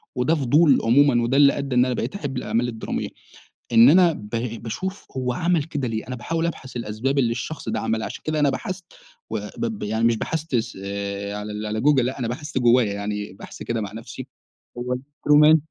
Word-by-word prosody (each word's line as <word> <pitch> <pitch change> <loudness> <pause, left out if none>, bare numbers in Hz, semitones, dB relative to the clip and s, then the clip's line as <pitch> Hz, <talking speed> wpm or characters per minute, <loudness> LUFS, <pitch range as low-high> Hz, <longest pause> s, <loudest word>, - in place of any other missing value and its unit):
وده 125 +6 +2
فضول 145 +1 +4
عمومًا 120 +1 +4
وده 125 +4 +1
اللي 140 -1 +6
أدى 140 -2 -2
إن 125 0 +5
أنا 130 - 0
بقيت 160 - -3
أحب 140 -9 -4
الأعمال 115 0 0
الدرامية 115 -2 -4 0.6
إن 115 +2 +8
أنا 175 +1 +6
ب 105 -8 -9 0.3
باشوف 190 - -4
هو 125 -1 -1
عمل 170 +3 +1
كده 145 -5 -3
ليه؟ 110 -1 -4
أنا 125 - -4
باحاول 165 +7 -2
أبحث 135 -7 -5
الأسباب 120 +4 -1
اللي 120 -3 +2
الشخص 125 +2 -4
ده - - -1
عملها 110 0 -1
عشان - - -7
كده 155 0 0
أنا 145 -1 +4
بحثت 185 +6 -4 0.4
و - - -2 0.2
ب - - -1
ب 225 -2 -4
يعني 110 +2 -1
مش 115 -1 +3
بحثت 160 0 -2 0.3
آآ، 100 0 -4
على 105 +1 -5
على 110 +1 -2
google 145 0 +4
لأ 130 +3 -3
أنا 120 - -1
بحثت 145 +5 -5
جوّايا 120 -4 +4
يعني 105 -1 -4
بحث 95 - -10
كده 115 -1 -2
مع 100 - -5
نفسي 115 +1 -8 0.5
هو 125 +1 -2
True 145 +3 +2
man 155 +1 +8
125 Hz, 205 wpm, -23 LUFS, 110-145 Hz, 0.6 s, إن